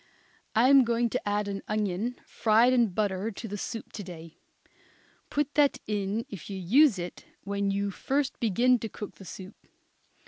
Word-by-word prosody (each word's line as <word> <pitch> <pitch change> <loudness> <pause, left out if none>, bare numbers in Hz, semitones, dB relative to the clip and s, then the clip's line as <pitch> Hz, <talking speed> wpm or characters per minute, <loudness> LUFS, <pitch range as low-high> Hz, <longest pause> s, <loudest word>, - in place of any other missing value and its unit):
I 235 +4 +5
am 275 -1 +8
going 235 -1 +1
to - - -2
add 205 0 0
an 195 -1 -4
onion 215 +3 -1
fried 230 +3 +3
in 240 -2 +4
butter 200 +1 -1
to 225 +2 -7
the 205 - -5
soup 225 +2 -6
to 205 - -6
day. 165 -3 -11 0.9
Put 295 0 -1
that 290 -2 +3
in, 210 +1 -2
if 190 -4 -9
you 195 - -4
use 230 - +4
it, 175 0 -7 0.2
when 200 0 -1
you 200 0 -1
first 275 +7 -1
begin 240 +3 +3
to 225 - -5
cook 205 0 -8
the 195 - -12
soup. 190 +3 -9
210 Hz, 175 wpm, -28 LUFS, 195-240 Hz, 0.9 s, am